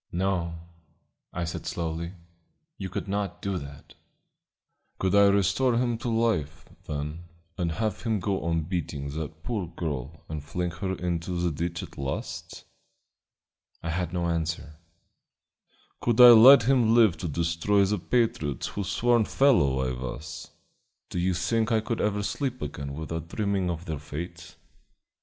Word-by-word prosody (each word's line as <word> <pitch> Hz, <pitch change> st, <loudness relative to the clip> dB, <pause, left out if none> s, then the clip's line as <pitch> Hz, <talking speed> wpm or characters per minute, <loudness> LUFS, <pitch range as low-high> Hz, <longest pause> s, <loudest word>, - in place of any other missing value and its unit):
"No," 90 Hz, -2 st, -1 dB, 0.8 s
I 90 Hz, -, -3 dB
said 85 Hz, -, -5 dB
slowly, 85 Hz, +1 st, -3 dB, 0.7 s
"you 95 Hz, -2 st, -4 dB
could 90 Hz, -, -4 dB
not 100 Hz, -2 st, -2 dB
do 100 Hz, -2 st, -2 dB
that." 70 Hz, 0 st, -11 dB, 1.0 s
"Could 95 Hz, 0 st, 0 dB
I 100 Hz, 0 st, +7 dB
restore 100 Hz, +6 st, +3 dB
him 120 Hz, -2 st, 0 dB
to 120 Hz, -, -3 dB
life, 95 Hz, -10 st, 0 dB, 0.2 s
then, 75 Hz, +3 st, -4 dB, 0.3 s
and 85 Hz, -4 st, -1 dB
have 110 Hz, +1 st, -2 dB
him 110 Hz, -3 st, 0 dB
go 95 Hz, +1 st, -1 dB
on 85 Hz, 0 st, +1 dB
beating 75 Hz, -4 st, -4 dB
that 80 Hz, +1 st, -6 dB
poor 105 Hz, -7 st, -2 dB
girl 80 Hz, -3 st, -5 dB
and 75 Hz, -2 st, -5 dB
flinging 90 Hz, +3 st, -3 dB
her 95 Hz, 0 st, -1 dB
into 85 Hz, 0 st, -2 dB
the 85 Hz, -1 st, +1 dB
ditch 85 Hz, +3 st, -3 dB
at -, -, -11 dB
last?" 70 Hz, 0 st, -5 dB, 1.2 s
I 85 Hz, -, -2 dB
had 90 Hz, 0 st, -2 dB
no 90 Hz, -1 st, -1 dB
answer. 80 Hz, -2 st, -2 dB, 1.2 s
"Could 120 Hz, -1 st, +1 dB
I 125 Hz, -1 st, +12 dB
let 120 Hz, +3 st, +9 dB
him 120 Hz, -2 st, +4 dB
live 110 Hz, -7 st, +6 dB
to 85 Hz, -, -4 dB
destroy 85 Hz, +6 st, +1 dB
the 105 Hz, +1 st, 0 dB
patriots 85 Hz, -, 0 dB
whose 100 Hz, -2 st, -4 dB
sworn 120 Hz, 0 st, +3 dB
fellow 85 Hz, -, +3 dB
I -, -, -1 dB
was? 65 Hz, +4 st, -6 dB, 0.6 s
Do 90 Hz, -, -2 dB
you 90 Hz, +1 st, +1 dB
think 110 Hz, +7 st, 0 dB
I 110 Hz, -, +4 dB
could 110 Hz, +1 st, -2 dB
ever 105 Hz, -1 st, 0 dB
sleep 130 Hz, +3 st, -2 dB
again 70 Hz, -1 st, -5 dB
without 80 Hz, +1 st, -5 dB
dreaming 100 Hz, -1 st, -1 dB
of 85 Hz, 0 st, -4 dB
their 80 Hz, -5 st, -4 dB
fate? 85 Hz, +4 st, -8 dB
90 Hz, 150 wpm, -27 LUFS, 80-105 Hz, 1.2 s, I